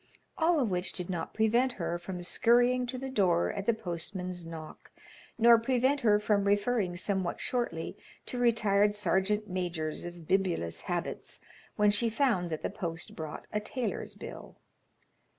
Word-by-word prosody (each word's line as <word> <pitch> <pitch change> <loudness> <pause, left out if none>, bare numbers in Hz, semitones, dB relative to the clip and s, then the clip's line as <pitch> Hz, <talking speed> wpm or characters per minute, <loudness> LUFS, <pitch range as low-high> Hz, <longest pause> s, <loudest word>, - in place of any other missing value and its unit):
All 330 0 +3
of 240 -7 +1
which 180 0 -1
did 180 0 -3
not 170 -2 -3
prevent 235 +4 +3
her 175 -3 -3
from 175 0 -6
scurrying 245 +6 +3
to 255 +1 -4
the 265 +1 -5
door 180 -8 +2
at 200 -1 -5
the 235 - +5
postman's 180 -1 -4
knock, 160 -2 -9 0.5
nor 235 0 +7
prevent 260 +4 +2
her 210 -5 +4
from 210 -1 +1
referring 205 -2 +1
somewhat 190 -1 -1
shortly 235 -10 -2 0.3
to 250 - -4
retired 210 -4 +3
sergeant 210 +1 +1
majors 175 -4 -3
of 175 -2 -9
bibulous 185 - 0
habits - - -3 0.4
when 210 0 +4
she 230 +3 +2
found 225 -7 +1
that 155 -1 -4
the - - -1
post 165 -2 -5
brought 155 -2 -6
a 210 - +1
tailor's 240 +4 -4
bill. - - -9
200 Hz, 155 wpm, -30 LUFS, 175-235 Hz, 0.5 s, nor